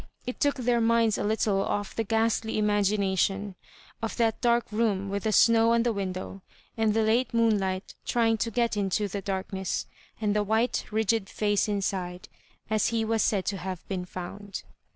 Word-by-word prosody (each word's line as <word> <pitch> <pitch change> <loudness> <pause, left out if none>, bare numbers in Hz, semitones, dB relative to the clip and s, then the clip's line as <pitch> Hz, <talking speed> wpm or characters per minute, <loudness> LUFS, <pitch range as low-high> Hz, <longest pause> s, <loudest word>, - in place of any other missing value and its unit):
It 250 - -5
took 285 0 +2
their 245 -2 +1
minds 230 -1 +3
a - - -1
little 210 -2 +1
off 205 +1 -2
the 225 - 0
ghastly 225 0 0
imagina 205 -2 +1
tion 200 +1 0 0.5
of 225 - -3
that 225 -2 +1
dark 235 0 +3
room 210 -3 0
with 200 +1 -3
the 220 - +2
snow 230 +1 +5
on 235 0 +3
the 235 -1 +1
window, 190 -1 -4 0.3
and 220 -1 +1
the 225 - +3
late 230 +2 +1
moonlight 200 -5 +1
trying 225 -2 +2
to 230 +2 -1
get 235 0 0
into 205 +1 0
the 200 +1 -4
darkness, 190 -1 -3 0.3
and 210 -1 0
the 210 - +3
white 220 +4 +1
rigid 220 -1 +1
&^ 205 +1 0
inside, 185 -3 -3 0.4
as 215 -1 +1
he 225 -1 0
was 225 0 +1
said 195 -3 +1
to 200 - -1
have 185 -1 -6
been 185 -2 -3
found. 190 +2 -7
210 Hz, 180 wpm, -27 LUFS, 195-225 Hz, 0.5 s, snow